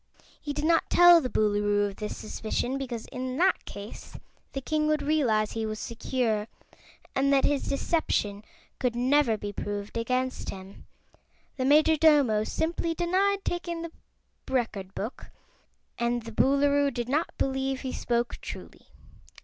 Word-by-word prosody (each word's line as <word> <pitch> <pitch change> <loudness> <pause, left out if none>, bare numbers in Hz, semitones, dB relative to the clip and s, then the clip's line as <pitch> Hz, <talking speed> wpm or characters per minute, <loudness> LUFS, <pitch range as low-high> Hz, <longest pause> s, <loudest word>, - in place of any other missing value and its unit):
He 295 - -4
did 295 +1 -2
not 330 0 +3
tell 350 -1 +8
the 255 - -3
Boolooroo 205 -1 +2
of 200 -1 -5
this 210 -1 -5
suspicion, 240 +5 -3
because 240 -4 -5
in 255 0 -4
that 370 +3 +2
case 205 +2 -9 0.4
the 275 - -2
king 305 +3 0
would 305 -1 +1
realize 245 -8 +2
he 225 - -3
was 215 0 -3
secure, 230 -2 -1 0.7
and 275 +1 +2
that 275 -1 +4
his 290 -1 0
deception 215 -9 0 0.4
could 250 -3 0
never 255 -1 +3
be 205 0 -6
proved 205 +1 -5
against 255 +3 -1
him. 190 0 -10 0.7
The 255 - -1
Majordomo 295 -6 +4
simply 330 +3 -1
denied 385 +4 +1
taking 345 -1 -3
the 335 - -6 0.6
Record 215 -7 -2
Book, 220 +5 -6 0.7
and 235 0 0
the 230 - -8
Boolooroo 280 +3 +3
did 240 -2 -3
not 300 +6 -1
believe 265 0 -1
he 260 - -4
spoke 235 0 -1
truly. - - -9
260 Hz, 145 wpm, -27 LUFS, 220-300 Hz, 0.7 s, tell